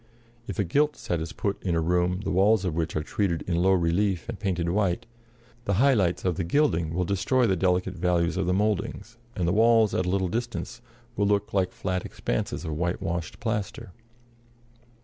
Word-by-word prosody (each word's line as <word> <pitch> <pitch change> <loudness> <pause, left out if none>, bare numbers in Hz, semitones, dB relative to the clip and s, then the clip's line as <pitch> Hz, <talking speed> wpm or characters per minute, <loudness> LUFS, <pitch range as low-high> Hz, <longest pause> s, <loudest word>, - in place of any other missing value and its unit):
If - - -5
a 100 - +2
gilt 150 - +1
set 85 -2 -2
is 80 - -5
put 100 -1 -3
in 90 -3 -1
a - - +2
room 90 +3 +1
the 95 - -3
walls 100 +2 +3
of 90 - -1
which 80 0 -2
are 75 - 0
treated 85 -1 -1
in 85 -2 -1
low 95 +1 +4
relief 90 +3 +1
and 115 -3 -6
painted 90 -5 -1
white, 100 +3 0 0.6
the 100 - +1
high 135 +7 +5
lights 95 -7 +1
of 90 -2 0
the 90 - -1
gilding 85 - +1
will 90 0 0
destroy 110 +8 +1
the 95 - +2
delicate 90 +1 +1
values 90 -1 +1
of 95 -1 -1
the - - +2
mouldings, 105 +2 -2 0.2
and 90 -3 -1
the 90 - +2
walls, 115 -1 +4
at 90 - 0
a - - +1
little 95 0 +1
distance, 120 +4 -4 0.3
will 100 - +1
look 105 +1 0
like 95 -2 +1
flat 95 -1 -3
expanses - - -3
of 80 - -3
whitewashed 85 -2 -2
plaster. 105 -5 -3
95 Hz, 200 wpm, -26 LUFS, 85-105 Hz, 0.6 s, high